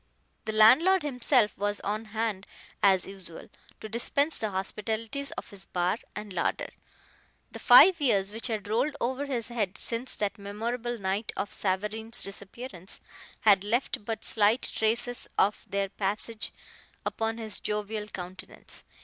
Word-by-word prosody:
The 220 - -1
landlord 285 - +6
himself 250 -5 +2
was 205 0 0
on 215 +2 -2
hand 215 -2 -2 0.3
as 190 -2 +4
usual, 185 -4 -11 0.3
to - - -5
dispense 280 +7 +1
the 215 - -1
hospitalities 220 +7 -3
of - - -7
his 200 -2 -8
bar 180 +4 0 0.2
and 210 -2 -6
larder. 175 - -1 0.8
The - - -8
five 365 -4 +8
years 200 -7 +2
which 225 +3 -3
had 215 -3 -3
rolled 250 +8 +1
over 260 +4 -1
his 250 -4 -2
head 215 -4 -2
since 235 +3 -2
that 205 +1 -2
memorable 235 +4 -3
night 195 +1 -1
of 205 - -3
Savareen's 210 +4 -1
disappearance 195 -1 -5 0.4
had 200 -3 +5
left 230 +1 0
but 225 +1 -4
slight 220 +3 +3
traces 235 +2 0
of 205 +2 +2
their 200 0 0
passage 210 +3 -2 0.5
upon 225 0 -1
his 220 -3 -5
jovial 210 0 -3
countenance. 185 -2 -8
215 Hz, 140 wpm, -28 LUFS, 200-235 Hz, 0.8 s, five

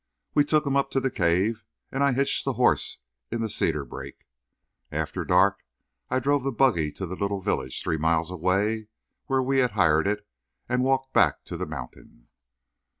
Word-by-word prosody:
We 145 - +5
took 150 0 +2
him 140 -1 0
up 140 - +2
to - - +6
the 135 0 -1
cave 95 +5 +1 0.3
and 135 +1 0
I 140 -2 +3
hitched 135 +2 +1
the - - -1
horse - - +1 0.3
in 115 0 -2
the 110 -2 -2
cedar 75 -7 0
brake. 65 +2 -9 0.7
After - - -2
dark 95 +2 +3 0.5
I 130 - +1
drove 140 +1 +1
the 135 - 0
buggy 110 - +2
to 95 - -5
the 95 +1 -5
little 100 0 -2
village, 65 -10 -2
three 80 - 0
miles 80 +2 +1
away, 100 +5 0 0.4
where 135 -1 +2
we 135 +1 +2
had 125 -4 +2
hired 80 -1 +4
it, 105 0 -2 0.4
and 125 0 +1
walked 135 0 0
back - - +3
to - - -6
the - - -4
mountain. 60 -4 -10
105 Hz, 185 wpm, -26 LUFS, 85-130 Hz, 0.7 s, to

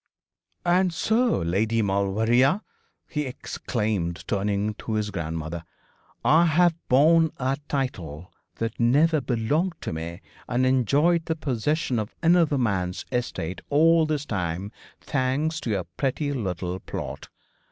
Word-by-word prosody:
'And 180 +1 +3
so, 225 +8 +2
Lady 110 +6 +1
Maulevrier,' 110 - +2 0.5
he 150 -3 -2
exclaimed, 105 -8 -3
turning 100 +1 0
to 110 - -4
his 105 -1 -1
grandmother, 85 -2 -4 0.6
'I 165 +3 +6
have 170 +2 +4 0.2
borne 160 +5 +5
a 135 +1 0
title 90 - -4 0.2
that 115 0 -4
never 145 +6 +4
belonged 140 +9 0
to - - -4
me, 85 +3 -6 0.3
and 125 +1 +1
enjoyed 145 +7 +3
the 160 - -1
possession 140 -2 -1
of 105 0 -5
another 165 -3 +4
man's 95 -7 -1
estates 95 -8 -3
all 160 +2 +4
this 150 -2 -1
time, 95 - -3 0.3
thanks 145 +4 -1
to 120 - -5
your 100 -4 0
pretty 145 +2 -1
little 90 -6 -3
plot. - - -6
125 Hz, 125 wpm, -25 LUFS, 100-155 Hz, 0.6 s, I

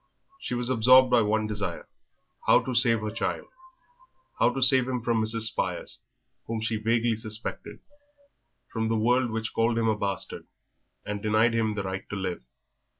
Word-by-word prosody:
She 125 - -4
was 120 +1 -1
absorbed 130 +2 +5
by 120 -1 +5
one 110 0 0
desire, 105 -2 -4 0.6
how - - +5
to 130 - -5
save 115 -1 +3
her 110 0 -4
child 115 - -3 0.9
how - - +4
to - - -4
save 130 0 +6
him 125 -3 -3
from 115 -2 +1
Mrs. 110 +1 0
Spires, 110 - -2 0.5
whom 115 0 -3
she 110 0 -2
vaguely 115 +1 0
suspected; 110 +1 -6 0.9
from 110 -1 -1
the 115 0 0
world, 120 +3 +2
which 115 0 -4
called 115 +1 +1
him 115 -1 +1
a 110 - +2
bastard 100 -2 -5 0.6
and 105 0 -4
denied 110 +2 +2
to 115 - 0
him 110 -2 -1
the 100 - -3
right 95 0 -6
to - - -5
live. 95 -2 -4
115 Hz, 175 wpm, -26 LUFS, 110-120 Hz, 0.9 s, save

